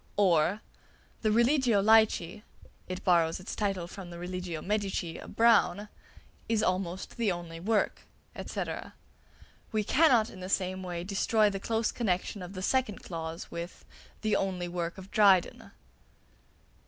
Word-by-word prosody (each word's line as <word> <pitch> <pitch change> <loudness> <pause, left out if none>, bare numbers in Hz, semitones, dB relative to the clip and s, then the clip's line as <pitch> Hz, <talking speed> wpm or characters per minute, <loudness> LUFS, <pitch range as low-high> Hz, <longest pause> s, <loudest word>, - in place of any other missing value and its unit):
or, 185 0 +3 0.6
"The 215 - +2
'Religio 235 -1 +3
Laici' 210 -4 +3 0.5
(it 185 +1 -5
borrows 170 -3 +3
its 185 - -6
title 195 -4 -1
from 190 0 -9
the 170 - -9
'Religio 180 -1 -5
Medici' 195 -4 -2
of - - -11
Browne) 220 -3 +4 0.6
is 225 -2 +2
almost 185 +2 -2
the 225 -4 +1
only 170 -2 -6
work," 210 +4 0 0.4
&c. - - -3 1.1
We 215 -1 0
cannot 250 -2 +4
in - - -11
the 185 0 -6
same 185 -1 0
way 175 -2 -4
destroy 205 +2 +2
the 195 - -4
close 225 +2 0
connexion 200 -2 -2
of 180 +1 -8
the 185 -1 -6
second 255 -3 0
clause 165 -1 -6
with 170 +1 -7 0.4
"the 215 -1 +1
only 185 -3 -1
work 175 +1 -4
of 190 +1 -11
Dryden." 195 -4 +3
190 Hz, 140 wpm, -29 LUFS, 175-215 Hz, 1.1 s, Browne